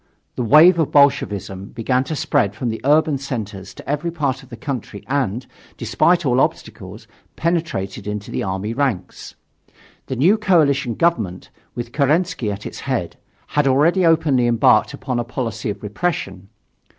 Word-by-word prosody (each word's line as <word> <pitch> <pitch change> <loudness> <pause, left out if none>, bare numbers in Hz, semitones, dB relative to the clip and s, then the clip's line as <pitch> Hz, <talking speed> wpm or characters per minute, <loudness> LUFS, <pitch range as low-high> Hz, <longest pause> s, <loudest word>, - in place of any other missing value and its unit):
The - - -3
wave 155 +9 +6
of 160 - +1
Bolshevism 100 -9 +2
began 125 +3 0
to 155 - -4
spread 125 -8 0
from 125 - -3
the 110 - -4
urban 150 0 +3
centers 105 -8 -6
to - - -12
every 150 +4 -1
part 145 -5 -2
of 135 - -17
the 120 - -9
country 120 -5 -6
and, 130 -4 -1 0.3
despite 175 -1 +2
all 130 0 +3
obstacles, - - -4 0.3
penetrated 160 - -2
into 105 0 -5
the - - -2
army 95 +3 -3
ranks. 125 -8 -3 0.7
The 130 - -3
new 180 - +3
coalition 140 - +2
government, 110 - -1 0.2
with 120 0 -5
Kerensky 150 - +1
at 100 0 -7
its - - -7
head, - - -3 0.3
had 150 -1 +1
already 155 +8 +3
openly 155 -7 +3
embarked 110 -2 +3
upon 130 -2 -3
a - - 0
policy 120 -3 -4
of 100 0 -6
repression. 100 - -3
130 Hz, 155 wpm, -20 LUFS, 105-150 Hz, 0.7 s, wave